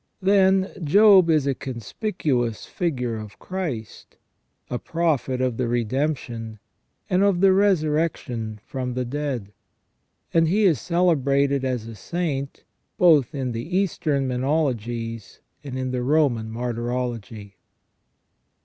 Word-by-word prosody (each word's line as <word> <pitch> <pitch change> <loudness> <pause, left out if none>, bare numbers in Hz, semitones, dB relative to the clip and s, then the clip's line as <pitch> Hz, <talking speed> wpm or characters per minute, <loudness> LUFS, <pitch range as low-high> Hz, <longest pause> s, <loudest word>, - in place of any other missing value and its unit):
Then, 190 0 +3
Job 195 +2 +6
is 155 -4 +3
a 140 - +1
conspicuous 125 - -3
figure 125 -10 -2
of 105 -2 -9
Christ, 160 - -6 0.5
a 125 - -3
prophet 145 -7 -1
of 125 -3 0
the 125 - 0
Redemption, 120 -2 -2 0.5
and 185 0 +2
of 200 -3 +3
the 190 0 +5
Resurrection 155 - 0
from 125 -2 -4
the 125 0 -1
dead; 125 -6 -4 0.8
and 165 -1 +4
he 205 +6 +2
is 170 - +3
celebrated 140 -6 +2
as 125 -4 -2
a 115 - -8
saint 140 - -4 0.3
both 155 -5 +4
in 130 -3 -2
the 120 +11 -3
Eastern 155 -8 0
menologies 120 - -2 0.2
and 135 -3 -6
in 130 -1 -2
the 125 -1 -2
Roman 125 -5 +1
martyrology. 120 -3 -4
135 Hz, 120 wpm, -23 LUFS, 120-165 Hz, 0.8 s, Job